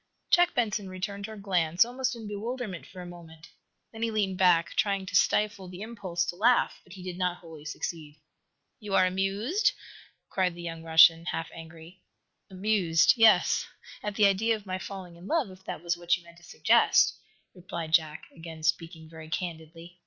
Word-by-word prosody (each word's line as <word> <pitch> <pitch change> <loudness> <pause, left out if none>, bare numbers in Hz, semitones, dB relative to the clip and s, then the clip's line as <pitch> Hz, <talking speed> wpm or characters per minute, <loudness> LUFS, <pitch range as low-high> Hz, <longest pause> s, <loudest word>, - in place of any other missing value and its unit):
Jack 350 0 +4
Benson 210 -4 -1
returned 200 +2 -5
her 220 -1 -9
glance, 180 -2 +2
almost 255 +1 -2
in, 225 -2 -8
bewilderment 210 -2 -5
for 185 - -11
a - - -8
moment. 165 -2 -13 0.4
Then 225 - -10
he 230 - +1
leaned 200 -4 -1
back, 170 -2 +4
trying 195 -2 0
to 185 - -6
stifle 210 -3 +2
the 180 +2 -8
impulse 195 -7 -3
to 170 - -4
laugh, 235 +6 +2
but 185 - -15
he 190 -2 -10
did 180 0 -6
not 180 -1 0
wholly 160 -3 -13
succeed. 155 -1 -6 0.6
"You 205 -4 -3
are 185 - +5
amused?" 205 - 0 0.5
cried 185 -2 0
the 175 - -9
young 165 -1 -6
Russian, 165 +1 +6
half 165 -2 -3
angry. 165 +2 -12 0.5
"Amused 185 -4 +3
yes, 225 -2 +4 0.3
at 210 -1 -4
the 210 - +4
idea 210 +4 +3
of 210 -2 -11
my 185 -1 -4
falling 185 -3 -8
in 175 +3 -12
love, 305 - 0
if 185 0 -15
that 155 - -6
was 175 0 0
what 175 0 +1
you 175 - -17
meant 170 0 -17
to 175 - -19
suggest," - - +3 0.3
replied 170 -3 -7
Jack, 155 -2 +2
again 165 -1 -10
speaking 160 0 -2
very 160 -1 -11
candidly. 165 +1 -6
185 Hz, 180 wpm, -28 LUFS, 165-205 Hz, 0.6 s, Russian